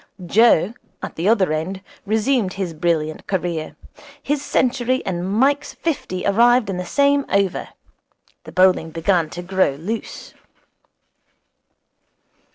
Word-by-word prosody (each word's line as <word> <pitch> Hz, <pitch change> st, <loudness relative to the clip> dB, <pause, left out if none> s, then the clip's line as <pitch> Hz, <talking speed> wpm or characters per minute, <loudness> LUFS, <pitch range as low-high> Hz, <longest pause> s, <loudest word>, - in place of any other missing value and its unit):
Joe, 215 Hz, 0 st, +4 dB, 0.3 s
at -, -, -6 dB
the 175 Hz, +5 st, 0 dB
other 195 Hz, -8 st, +3 dB
end, 185 Hz, +5 st, -4 dB, 0.2 s
resumed 220 Hz, -1 st, +1 dB
his 190 Hz, -4 st, -4 dB
brilliant 155 Hz, -1 st, -1 dB
career. 175 Hz, -4 st, -3 dB, 0.5 s
His 290 Hz, 0 st, -1 dB
century 255 Hz, -1 st, 0 dB
and 180 Hz, 0 st, -3 dB
Mike's 275 Hz, +7 st, +1 dB
fifty 255 Hz, -, -3 dB
arrived 235 Hz, +1 st, +4 dB
in 185 Hz, -, -4 dB
the 180 Hz, 0 st, -5 dB
same 280 Hz, +3 st, +3 dB
over. 200 Hz, -2 st, 0 dB, 0.8 s
The -, -, -10 dB
bowling 185 Hz, -3 st, +3 dB
began 165 Hz, 0 st, 0 dB
to 175 Hz, +2 st, -7 dB
grow 185 Hz, -6 st, +1 dB
loose. 205 Hz, +10 st, -6 dB
190 Hz, 120 wpm, -20 LUFS, 175-235 Hz, 0.8 s, Joe